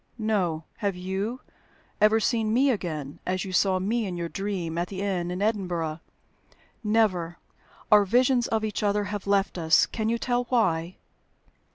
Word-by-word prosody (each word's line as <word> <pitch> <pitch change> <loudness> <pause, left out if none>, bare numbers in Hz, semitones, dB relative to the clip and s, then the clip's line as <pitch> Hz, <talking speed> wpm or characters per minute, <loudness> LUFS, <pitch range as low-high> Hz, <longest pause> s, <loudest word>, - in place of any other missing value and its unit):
"No. 195 -8 0
Have 200 -4 -1
you 190 +7 -3 0.6
ever 215 +1 +5
seen 225 -1 +1
me 265 +4 +4
again, 155 - -4
as 185 +1 -2
you 190 - -6
saw 190 0 +3
me 215 +4 -1
in 180 -2 -4
your 170 -1 -3
dream 190 -5 -3
at 175 - -1
the 190 0 -7
inn 180 -3 -1
in 180 +3 -2
Edinburgh?" 175 -7 -1 0.8
"Never. 200 -6 +1 0.5
Our 210 -1 +8
visions 245 +4 +3
of 220 -1 0
each 215 - -3
other 205 0 +1
have 205 -1 -5
left 195 -2 +1
us. 160 0 +4
Can 220 -1 -2
you 235 - +1
tell 245 +1 0
why?" 185 -8 0
200 Hz, 165 wpm, -26 LUFS, 180-220 Hz, 0.8 s, Our